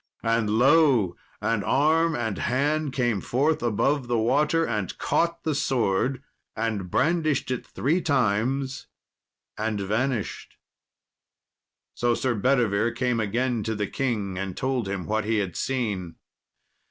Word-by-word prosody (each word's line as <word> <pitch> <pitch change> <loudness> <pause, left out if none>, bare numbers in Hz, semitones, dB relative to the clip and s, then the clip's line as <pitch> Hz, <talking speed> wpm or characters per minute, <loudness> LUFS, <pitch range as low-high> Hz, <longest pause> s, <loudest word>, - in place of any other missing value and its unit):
And 115 -1 +1
lo! 125 - +4 0.3
an 110 -1 +1
arm 160 - +2
and 110 -6 -2
hand 145 +4 0
came 120 -6 0
forth 145 +6 +1
above 120 +4 +1
the 120 -1 +1
water, 150 +8 +2
and 105 -6 -3
caught 170 0 0
the 155 - 0
sword, 130 -1 0 0.3
and 110 -5 -2
brandished 155 - +1
it 125 - -3
three 160 +8 0
times, 135 0 0 0.7
and 110 -1 -1
vanished. 110 +4 -2 1.4
So 120 0 +1
Sir 130 0 0
Bedivere 115 -2 +2
came 125 -2 0
again 120 +3 0
to 110 +1 -2
the 105 0 -1
king 105 -6 -2
and 95 -2 -4
told 130 -4 -1
him 95 -3 -3
what 110 +1 0
he 110 0 +1
had 95 -4 -2
seen. 105 -10 -2
120 Hz, 130 wpm, -25 LUFS, 105-135 Hz, 1.4 s, lo